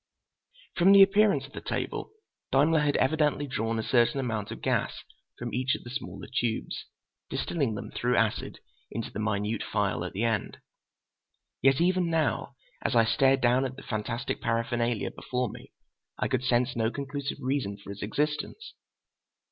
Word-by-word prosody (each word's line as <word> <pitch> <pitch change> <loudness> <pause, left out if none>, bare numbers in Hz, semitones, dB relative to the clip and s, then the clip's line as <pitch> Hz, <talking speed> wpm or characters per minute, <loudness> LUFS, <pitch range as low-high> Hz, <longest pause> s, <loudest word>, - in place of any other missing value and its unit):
From 190 +3 +6
the 200 0 +10
appearance 200 +1 +4
of - - -15
the - - -6
table, - - -3 0.4
Daimler 150 +4 +4
had 150 -1 +2
evidently 150 -1 +2
drawn 115 -4 -2
a 110 - -1
certain 120 +4 +3
amount 110 -5 -2
of - - -6
gas - - -1 0.3
from 120 0 -5
each 130 +1 +1
of - - -9
the 120 - -9
smaller 135 - -6
tubes, 115 -2 -2 0.4
distilling 140 -10 -1
them - - -6
through 125 0 0
acid 115 -2 0 0.3
into 115 +1 -5
the - - -5
minute 105 0 -1
phial - - -1
at - - -5
the 100 - -1
end. 115 -3 0 1.0
Yet 135 0 +4
even 180 0 +2
now, 165 -1 0 0.3
as - - 0
I 115 -1 +6
stared 135 +3 +3
down 125 +2 +4
at 130 -1 -3
the 135 - -11
fantastic 115 +3 -3
paraphernalia 115 -1 0
before 125 -1 -2
me, - - -12 0.5
I - - 0
could 130 -1 0
sense 125 0 +2
no 115 -1 +1
conclusive 140 +2 -4
reason 130 -7 -1
for 100 0 -10
its 100 - -8
existence. 150 - -2
125 Hz, 165 wpm, -28 LUFS, 115-145 Hz, 1.0 s, the